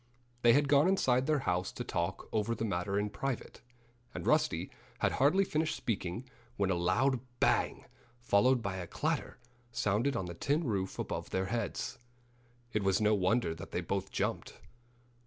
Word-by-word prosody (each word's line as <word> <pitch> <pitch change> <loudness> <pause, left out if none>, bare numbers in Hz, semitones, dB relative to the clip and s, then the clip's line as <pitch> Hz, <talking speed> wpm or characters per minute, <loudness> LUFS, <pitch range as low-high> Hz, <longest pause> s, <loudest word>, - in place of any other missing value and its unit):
They 120 0 +6
had 145 +1 +4
gone 145 +3 +5
inside 130 -9 +2
their 150 -3 +2
house 90 +1 0
to - - -4
talk - - -2
over 110 +2 0
the 115 - -2
matter 100 0 -1
in 105 0 0
private. 125 +4 -4 0.5
And - - -5
Rusty - - +2 0.3
had - - +1
hardly 175 +9 +3
finished 155 -2 0
speaking 105 +2 -3 0.3
when 100 -1 +1
a - - +3
loud 95 +10 +2 0.2
bang, - - +2 0.3
followed 120 +2 +3
by 95 -3 -2
a 90 -2 -5
clatter, 155 - -2 0.3
sounded 120 +3 +1
on 105 - -1
the 85 - -6
tin 145 - 0
roof 100 -8 -2
above - - -4
their 95 0 0
heads. 115 -4 -3 0.7
It 105 - +1
was 95 -1 +2
no 105 0 +3
wonder 100 -1 +2
that 90 +4 -9
they 90 - -2
both 95 +2 -2
jumped. - - -3
110 Hz, 170 wpm, -32 LUFS, 95-135 Hz, 0.7 s, They